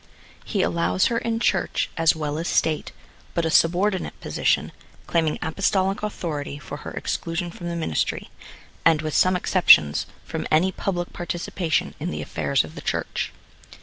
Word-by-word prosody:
He - - 0
allows 85 +2 +1
her 230 - +2
in 230 -1 -1
Church, - - +1
as 165 -1 +4
well 150 -1 -3
as 170 - -3
State, 155 -2 +1 0.4
but 170 - +1
a 160 - 0
subordinate 180 +4 +2
position, - - 0 0.3
claiming 160 -3 +1
Apostolic 195 +3 +1
authority 155 -9 -4
for 145 0 -8
her - - -7
exclusion 170 +1 -3
from 175 0 -6
the 170 - -3
ministry, 120 - -2 0.5
and, 160 -2 +4
with 155 -1 -3
some 185 0 +4
exceptions, 175 - +5 0.2
from - - -4
any 170 +5 +3
public 175 -2 -3
participation 175 -1 -2
in 165 +4 -3
the - - -4
affairs 140 - 0
of 80 - -10
the - - -8
Church. - - -2
165 Hz, 155 wpm, -24 LUFS, 150-180 Hz, 0.5 s, exceptions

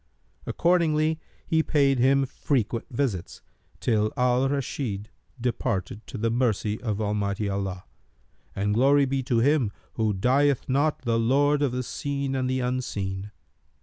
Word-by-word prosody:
Accordingly 160 -2 +2 0.3
he 160 -1 +2
paid 140 -4 +2
him 135 +2 +4
frequent 120 -4 -1
visits, 120 -9 -3 0.4
till 110 -2 +1
Al 125 +1 +2
Rashid 120 -7 -3 0.3
departed 115 -5 -2
to - - -7
the 115 +1 0
mercy 110 -3 0
of 110 -4 -2
Almighty 105 -1 -1
Allah; 95 -2 -3 0.7
and 105 +1 0
glory 140 +5 +4
be 135 0 -1
to 125 -2 0
Him 135 -4 +3 0.2
who 110 -2 +1
dieth 135 +7 +2
not 145 +3 +1
the 115 -2 +1
Lord 140 +5 +3
of 140 -3 +2
the 125 +1 -2
Seen 140 +1 -3
and 130 -1 0
the 130 0 0
Unseen! 105 -6 -3
125 Hz, 140 wpm, -26 LUFS, 105-140 Hz, 0.7 s, him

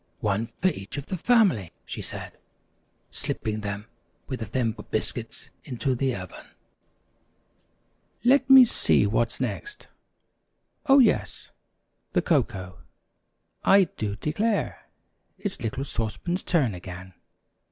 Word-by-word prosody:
"One 105 +2 0
for 170 +10 0
each 100 - -6
of 140 - -4
the 190 - -3
family," 185 - +3
she - - -5
said, - - -6 0.8
slipping 110 0 -2
them 100 0 -4 0.4
with 130 - -5
the 110 - -4
Thimble 115 0 -2
Biscuits - - -2
into 130 +2 -1
the 130 0 0
oven. 90 -2 -8 1.8
"Let 265 +2 +4
me 265 -1 +10
see 225 - +2
what's 115 +3 0
next. 415 - -5 1.0
Oh, 275 0 +7
yes, 250 -6 +2 0.6
the - - +3
cocoa. 95 -2 0 0.8
I 195 0 +6
do 105 -2 -3
declare, 205 - -1 0.5
it's 200 -4 -5
little 120 +4 -3
Sauce 110 -5 -3
Pan's 180 +1 -2
turn 140 - +1
again. 90 +1 -9
125 Hz, 120 wpm, -26 LUFS, -, 1.8 s, me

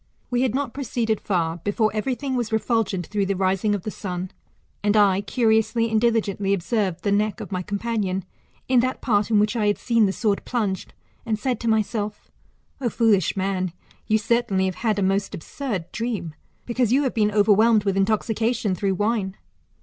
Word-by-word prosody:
'* - - -41
We 245 0 +1
had 255 -2 +1
not 275 -4 -2
proceeded 235 -5 -1
far, 170 -4 0
before 205 +5 0
everything 260 +4 -2
was 240 -3 -2
refulgent 220 -5 0
through 200 +1 -1
the 195 - 0
rising 195 +2 +1
of 195 - -5
the 215 - -4
sun; 185 -2 -5 0.5
and 205 +1 +3
I 200 -2 +4
curiously 225 0 +1
and 220 -1 +2
diligently 205 -4 +1
observed 195 -1 -1
the 200 - +1
neck 205 -2 +1
of - - -7
my 185 -1 -1
companion, 200 -2 -2 0.4
in 255 -1 +4
that 255 +2 -1
part 210 -3 +1
in 220 - +3
which 210 +2 +2
I 215 -3 +1
had 205 - +2
seen 230 -4 +2
the - - 0
sword 205 0 0
plunged, 205 -7 -2 0.3
and 225 -2 -1
said 245 +1 -1
to 235 - -4
myself, 215 -1 -1 0.5
O 245 - +1
foolish 215 -7 +2
man, 185 -2 -1 0.3
you 215 - +3
certainly 215 -4 +1
have 190 - -1
had 220 -3 +1
a 200 - +1
most 195 +1 0
absurd 195 - -5
dream 225 -9 -3 0.3
beciuse 240 -1 0
you 275 +3 +4
have 260 - -1
been 210 -2 +2
overwhelmed 215 +1 +4
with 195 -2 0
intoxication 220 +1 +1
through 190 +1 0
wine. 205 -1 -1
210 Hz, 190 wpm, -23 LUFS, 195-230 Hz, 0.5 s, I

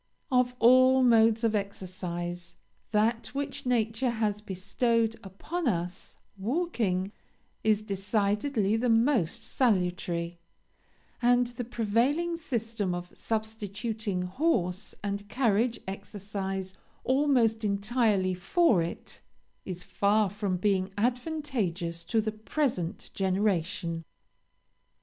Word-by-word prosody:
"Of 250 -1 +3
all 255 +2 +6
modes 225 -1 +5
of 225 -1 +2
exercise, 175 -3 -4 0.3
that 225 +2 +1
which 280 -2 -3
nature 230 +1 +1
has 215 -3 -1
bestowed 225 +4 0
upon 290 - -4
us, 180 -3 -2 0.2
walking, 215 - 0 0.5
is 215 -1 +3
decidedly 205 +2 0
the 245 +2 +1
most 230 - +2
salutary; 180 -7 0 0.8
and 245 0 +4
the 245 0 -5
prevailing 245 +9 +1
system 225 - -2
of 175 0 -6
substituting 220 -2 -3
horse 185 - -1
and 200 0 -3
carriage 230 -1 +1
exercise 195 -1 -4 0.3
almost 255 -5 +2
entirely 205 -2 +1
for 195 - +3
it, 165 +1 -6 0.4
is 180 -2 -5
far 205 -1 +2
from 200 -3 -1
being 190 0 +1
advantageous 235 - -1
to 225 +3 +2
the 215 0 -2
present 215 - -2
generation. 185 -3 0
215 Hz, 100 wpm, -29 LUFS, 190-240 Hz, 0.8 s, all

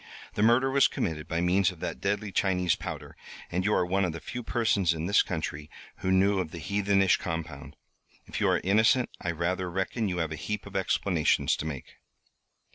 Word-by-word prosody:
The - - -2
murder 120 +4 +4
was 140 0 +5
committed 80 -3 -3
by 85 +1 -1
means 90 +1 +3
of 90 - -10
that - - -4
deadly 105 +1 -1
Chinese 90 -3 +1
powder, - - -7 0.4
and 90 +1 0
you 105 - +1
are 90 - +2
one 95 +2 +1
of 90 -3 -1
the 85 - -6
few 125 - -6
persons 100 -7 +1
in 80 +1 -3
this 100 +3 +4
country 80 -3 -4 0.3
who 95 - -1
knew 95 +1 +3
of 90 - -2
the 85 - -9
heathenish 100 +1 +2
compound. 80 -4 -6 0.5
If - - -5
you - - +3
are - - +2
innocent 110 +6 +3
I 90 - -2
rather 90 +2 -1
reckon 95 +4 -2
you 90 - -2
have 80 -2 -1
a - - -3
heap 105 +7 -4
of 100 -1 -11
explanations 95 -3 +1
to - - -4
make." 70 -5 -7
95 Hz, 200 wpm, -28 LUFS, 85-100 Hz, 0.5 s, was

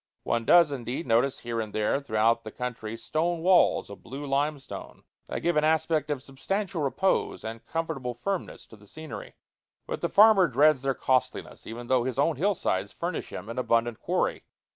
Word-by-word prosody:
One 115 -1 -1
does, 170 0 +6
indeed, 130 +3 -4
notice 120 +3 +2
here 115 -1 -2
and 110 -2 -6
there 110 +5 +1
throughout 115 -2 +1
the 110 - -6
country 115 -2 -5
stone 165 +7 -1
walls 180 0 +4
of 100 - -11
blue 135 +5 -7
limestone, 140 +1 -3 0.2
that - - -4
give 175 -1 +1
an 150 - +3
aspect 155 -1 +1
of 140 -3 -2
substantial 180 +6 -3
repose 185 +7 0
and 115 +1 -6
comfortable 135 -7 -3
firmness 190 +10 -4
to - - -15
the 105 -1 -19
scenery. 155 +7 -9 0.5
But - - -5
the - - 0
farmer 205 -3 +6
dreads 145 +1 +4
their 135 -1 0
costliness, 130 -2 -1
even 120 +2 -7
though 125 0 +2
his 130 -1 -3
own 145 +1 +2
hill 200 +6 +2
sides 100 - -1
furnish 170 -1 -4
him - - -7
an 115 +2 -4
abundant 115 -2 +1
quarry. - - -1
135 Hz, 185 wpm, -27 LUFS, 115-160 Hz, 0.5 s, does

